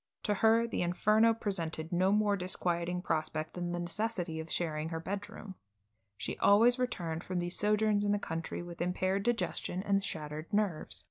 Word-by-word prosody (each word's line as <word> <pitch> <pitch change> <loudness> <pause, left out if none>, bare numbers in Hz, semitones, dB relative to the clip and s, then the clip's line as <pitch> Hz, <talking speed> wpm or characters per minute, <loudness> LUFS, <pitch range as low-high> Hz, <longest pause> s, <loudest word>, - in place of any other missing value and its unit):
To 210 - +1
her 225 +3 +4
the - - -2
Inferno 215 +6 +4
presented 165 -7 -2
no 185 +2 +3
more 210 -1 +3
disquieting 180 -1 -1
prospect 155 -1 -2
than 175 -1 -3
the 175 - -2
necessity 175 -2 -2
of 160 0 -6
sharing 155 -2 -1
her 165 -1 -3
bedroom. 200 +2 -6 0.6
She - - -4
always 230 +5 +5
returned 170 -10 -2
from 185 - -3
these 175 0 0
sojourns 210 0 +2
in 205 - +1
the 205 - +3
country 165 -3 -4
with 170 -1 -8
impaired 185 +2 0
digestion, 220 -4 -1
and 200 -1 +1
shattered 155 0 -5
nerves. 205 -7 -1
185 Hz, 170 wpm, -32 LUFS, 170-210 Hz, 0.6 s, always